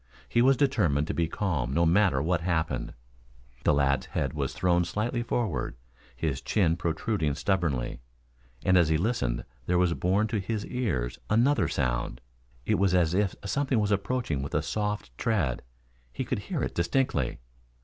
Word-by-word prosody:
He 120 - +2
was 130 +1 +5
determined 90 - +2
to - - -3
be 85 -1 +1
calm 80 - -1
no 85 +1 +4
matter 85 -5 +3
what 85 +1 +1
happened. 80 -7 -1 0.7
The - - +4
lad's 70 -1 +1
head 70 - -2
was 70 -3 -2
thrown 90 -1 +2
slightly 110 +7 -1
forward, 120 - -2 0.4
his 65 +1 -2
chin 85 -6 +2
protruding 85 -2 -1
stubbornly, 75 -6 -1 0.7
and 95 -1 +5
as 85 -3 +3
he 80 - +3
listened - - -1 0.2
there 90 - +2
was 90 -1 +3
borne 95 +5 +1
to 110 - 0
his 105 +2 -3
ears 80 - -2
another 125 +7 +3
sound. - - -1 0.5
It - - +1
was 95 -2 +3
as 85 -2 +3
if 100 0 +1
something 135 +3 +1
was 105 -1 +1
approaching 100 - 0
with 70 - -4
a 75 - +1
soft 105 - -3
tread. 85 - 0 0.5
He - - -4
could - - -1
hear - - -3
it - - -2
distinctly. 85 - 0
85 Hz, 165 wpm, -28 LUFS, 75-105 Hz, 0.7 s, was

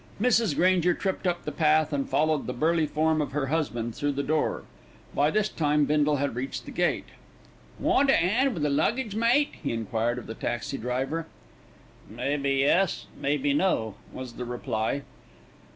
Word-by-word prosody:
Mrs. 225 - +3
Granger 180 0 +3
tripped 190 -1 -2
up 175 -1 -1
the - - -2
path 155 -1 +2
and 140 -1 -1
followed 155 -1 +1
the 125 - -2
burly 160 +3 +2
form 155 +1 +1
of 145 - -4
her 145 -1 0
husband 120 -8 -1
through 145 +3 -1
the 140 +1 -2
door. 155 +2 0 0.5
By 145 +1 +3
this 215 +5 +1
time 150 -5 +1
Bindle 150 0 +2
had 140 -2 -1
reached 130 +1 -4
the - - -8
gate. 175 0 0 0.7
"Want 275 0 +2
a - - +5
'and 235 +9 +2
wi' 165 - -4
the 150 - +1
luggage, 230 - 0
mate?" 240 +6 +3
he 145 - -2
enquired 115 +1 -1
of 125 - -7
the 110 - -6
taxi 120 +4 -3
driver. 135 +7 -2 0.8
"Maybe 140 +5 -1
yes, 145 +7 +2
maybe 145 0 0
no," 140 - +1 0.2
was 130 -2 -7
the 125 - -6
reply. 120 +2 -2
150 Hz, 170 wpm, -27 LUFS, 135-175 Hz, 0.8 s, a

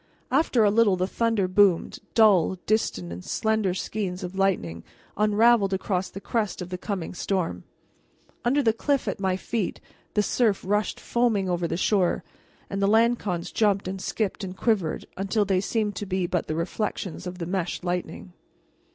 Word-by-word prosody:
After 265 -4 +3
a 205 - +4
little 210 -3 +4
the 185 0 0
thunder 225 -1 0
boomed, 185 -2 +3 0.2
dull, 200 -6 +5
distant, 95 - 0
and 90 +1 -8
slender 220 -4 0
skeins 190 -2 -3
of 180 0 -5
lightning 185 - 0 0.3
unraveled 210 -1 +4
across 185 -1 -1
the 195 - -8
crest 215 0 -2
of 180 -1 -6
the 180 - -4
coming 195 -4 -4
storm. 180 - -2 0.8
Under 275 +4 +2
the 225 -2 +3
cliff 275 +2 0
at 195 - -2
my 190 -1 0
feet 215 0 -3 0.4
the 210 - +3
surf 215 -2 +1
rushed 210 +2 0
foaming 230 -5 +1
over 175 -1 0
the 165 - -2
shore, 190 -2 +1 0.4
and 195 0 -3
the 195 - +3
lancons 220 -5 +2
jumped 205 -3 +1
and 190 0 -4
skipped 215 0 -2
and 185 -1 -6
quivered 195 -9 0
until 200 +2 +1
they 190 -1 +2
seemed 210 0 -1
to 205 - -4
be 185 -1 0
but 175 -1 -1
the 155 - -2
reflections 185 +1 -3
of 180 0 -6
the 170 - -4
meshed 180 0 -2
lightning. 180 0 -4
195 Hz, 170 wpm, -26 LUFS, 180-215 Hz, 0.8 s, dull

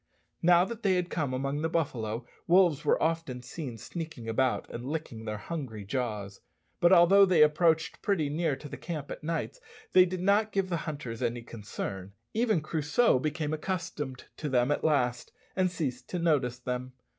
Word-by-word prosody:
Now 175 +1 +6
that 235 +1 -7
they 195 -4 +3
had 180 -1 -1
come 145 -6 -1
among 135 +3 -2
the 160 - 0
buffalo, 120 -8 -2 0.2
wolves 175 -4 +4
were 150 - +3
often 160 -6 -1
seen 125 -2 -6
sneaking 145 - -7
about 115 -1 +1
and 120 - -6
licking 130 -6 -5
their 105 -1 -3
hungry 110 -5 -6
jaws; 105 -4 -3 0.4
but 175 - +5
although 190 +2 +7
they 180 -5 +6
approached 160 +1 +2
pretty 185 -8 +1
near 155 0 0
to 140 +3 -10
the - - -7
camp 155 -5 -5
at - - -7
nights, 165 - -3 0.3
they 185 -1 +8
did 185 0 -4
not 205 +3 +3
give 195 -1 0
the 170 - 0
hunters 125 -7 -6
any 120 0 -1
concern. 100 -4 -6 0.2
Even 220 -6 +2
Crusoe 155 - +2
became 155 +2 -2
accustomed 155 -5 -4
to 150 - -3
them 125 +1 +2
at - - 0
last, 125 -6 +1 0.2
and 185 -1 +2
ceased 150 -8 -4
to 180 - -2
notice 145 -8 +1
them. 125 +1 -4
150 Hz, 180 wpm, -29 LUFS, 125-175 Hz, 0.4 s, they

